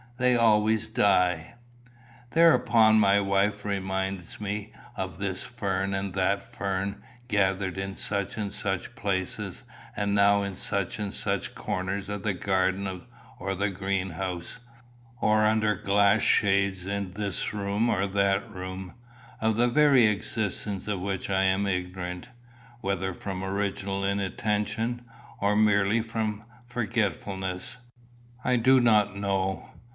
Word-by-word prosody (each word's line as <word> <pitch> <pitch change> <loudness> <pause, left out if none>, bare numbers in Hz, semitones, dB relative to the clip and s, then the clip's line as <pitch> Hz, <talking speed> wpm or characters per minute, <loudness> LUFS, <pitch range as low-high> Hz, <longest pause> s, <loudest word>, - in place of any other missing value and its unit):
They 125 0 +3
always 110 -1 +3
die." 90 -7 +2 0.8
Thereupon 115 -10 +5
my 100 -1 +5
wife 100 +1 +1
reminds 95 -2 -3
me 105 +1 -4 0.2
of 95 -3 -4
this 100 -2 -3
fern 100 -5 -2
and 95 -1 -3
that 100 +1 +1
fern, 100 -4 -3 0.3
gathered 95 -3 +1
in 95 0 -4
such 100 0 -2
and 100 -2 -3
such 95 +2 -3
places, 95 -3 -3 0.3
and 100 -1 0
now 100 0 +4
in 100 -1 -4
such 100 +2 -1
and 105 -2 -2
such - - -2
corners 95 +1 -3
of 105 -1 -4
the 100 -1 -1
garden 95 0 -1 0.4
or 95 +2 -2
the 100 +2 0
greenhouse, 95 -1 -3 0.6
or 110 -1 +3
under 110 0 +3
glass 100 +1 +3
shades 100 -2 +2
in 100 -2 -3
this 100 0 -2
or 100 0 0
that 100 0 +1
room, 95 0 -7 0.5
of 110 -1 +1
the 120 +1 +4
very 140 -2 +5
existence 105 -1 -1
of 105 -3 -1
which 95 0 -3
I 95 0 +2
am 95 +1 +2
ignorant, 90 +2 -3 0.5
whether 95 -1 -1
from 95 -2 -5
original 100 0 -2
inattention, 105 +4 -1 0.4
or 100 +1 +2
merely 105 +1 +3
from 110 -2 -3 0.2
forgetfulness, 105 -2 -2 0.7
I 125 - +2
do 130 +3 +5
not 105 -4 +3
know. 95 -2 -1
100 Hz, 125 wpm, -27 LUFS, 95-105 Hz, 0.8 s, Thereupon